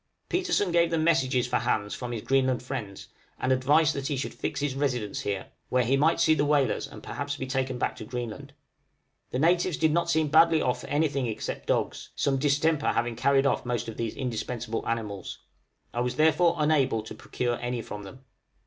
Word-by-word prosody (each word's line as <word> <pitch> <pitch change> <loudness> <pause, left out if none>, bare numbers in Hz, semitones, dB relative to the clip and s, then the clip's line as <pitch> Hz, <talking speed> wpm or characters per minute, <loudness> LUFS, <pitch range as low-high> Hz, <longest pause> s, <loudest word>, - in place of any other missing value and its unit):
Petersen 350 - +1
gave 170 0 +3
them 165 -1 0
messages 130 -6 +2
for 125 0 0
Hans 105 -3 -1
from 125 -1 -5
his 115 -3 -4
Greenland 130 -2 +1
friends, 115 -7 -6 0.3
and 130 - 0
advice 145 +5 +4
that 140 -1 -3
he 145 -3 -1
should 130 - -3
fix - - -3
his 145 -2 -1
residence 125 -7 -1
here, 100 -2 -4 0.2
where 125 0 +2
he 125 +4 +2
might 155 +4 +3
see 155 - +5
the 145 -2 +1
whalers 145 -5 +1
and - - -12
perhaps 145 0 -4
be 130 - -4
taken 130 -1 -2
back - - -1
to - - -7
Greenland. 125 +4 -6 0.8
The - - -3
natives 170 +3 +2
did 160 -1 +3
not 170 +1 +1
seem 160 -1 +3
to - - -4
be - - -15
badly 165 0 +6
off 125 0 0
for - - -9
anything 145 -3 0
except 110 - -5
dogs, - - -1
some 135 -1 +1
distemper 145 +2 +2
having 120 -1 -1
carried 135 +3 +3
off 140 - +1
most 120 -1 -2
of 115 - -7
these 115 -2 -3
indispensable 115 -2 -3
animals. 105 -5 -3 0.6
I 120 - -1
was 125 0 -1
therefore 165 +2 +4
unable 140 -7 +2
to 110 - -8
procure 120 -1 -3
any 120 -1 -3
from 105 - -7
them. 130 +7 -12
135 Hz, 205 wpm, -27 LUFS, 120-150 Hz, 0.8 s, badly